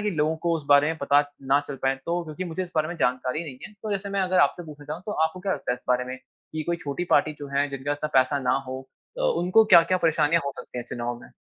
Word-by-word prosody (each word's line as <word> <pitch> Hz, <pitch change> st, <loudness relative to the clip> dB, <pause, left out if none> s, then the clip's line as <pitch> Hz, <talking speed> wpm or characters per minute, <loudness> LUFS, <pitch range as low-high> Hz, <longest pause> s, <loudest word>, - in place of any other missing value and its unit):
कि -, -, +1 dB
लोगों 155 Hz, +1 st, +1 dB
को 170 Hz, -, +3 dB
उस 155 Hz, -, -8 dB
बारे 145 Hz, +1 st, +6 dB
में 160 Hz, +1 st, -1 dB
पता 140 Hz, +1 st, +4 dB, 0.2 s
ना 135 Hz, +2 st, +3 dB
चल 140 Hz, -, -5 dB
पाए, 135 Hz, 0 st, +2 dB
तो 175 Hz, +1 st, 0 dB
क्योंकि 160 Hz, +4 st, -5 dB
मुझे 175 Hz, +2 st, -3 dB
इस 180 Hz, -, -8 dB
बारे 155 Hz, -1 st, +1 dB
में 175 Hz, -, -5 dB
जानकारी 125 Hz, +5 st, 0 dB
नहीं 130 Hz, -4 st, -8 dB
है। 210 Hz, -, -15 dB
तो 215 Hz, -, -4 dB
जैसे 200 Hz, 0 st, -3 dB
मैं 200 Hz, 0 st, 0 dB
अगर 185 Hz, 0 st, +2 dB
आपसे 145 Hz, +5 st, +2 dB
पूछना 150 Hz, -1 st, -11 dB
चाहूँ, 155 Hz, +4 st, -6 dB
तो 210 Hz, -, -2 dB
आपको 160 Hz, +3 st, -3 dB
क्या 195 Hz, +1 st, -1 dB
लगता 125 Hz, -, -2 dB
है -, -, 0 dB
इस -, -, -22 dB
बारे 125 Hz, 0 st, +2 dB
में 130 Hz, +1 st, -6 dB
कि 145 Hz, +4 st, -9 dB
कोई 170 Hz, +2 st, -1 dB
छोटी 145 Hz, +5 st, -2 dB
पार्टी 155 Hz, +1 st, +4 dB
जो 145 Hz, -, -6 dB
है, 145 Hz, +1 st, +2 dB
जिनके 135 Hz, +1 st, -4 dB
पास 145 Hz, -, 0 dB
इतना 155 Hz, -, +1 dB
पैसा 135 Hz, +3 st, 0 dB
ना -, -, +4 dB
हो 130 Hz, +1 st, -5 dB, 0.4 s
अ, -, -, -4 dB
उनको 225 Hz, -, +4 dB
क्या-क्या 185 Hz, -2 st, +6 dB
परेशानियाँ 165 Hz, 0 st, +3 dB
हो 140 Hz, -, -2 dB
सकती -, -, -8 dB
हैं 120 Hz, -, -4 dB
चुनाव 120 Hz, 0 st, -4 dB
में? -, -, -13 dB
155 Hz, 290 wpm, -25 LUFS, 140-175 Hz, 0.4 s, बारे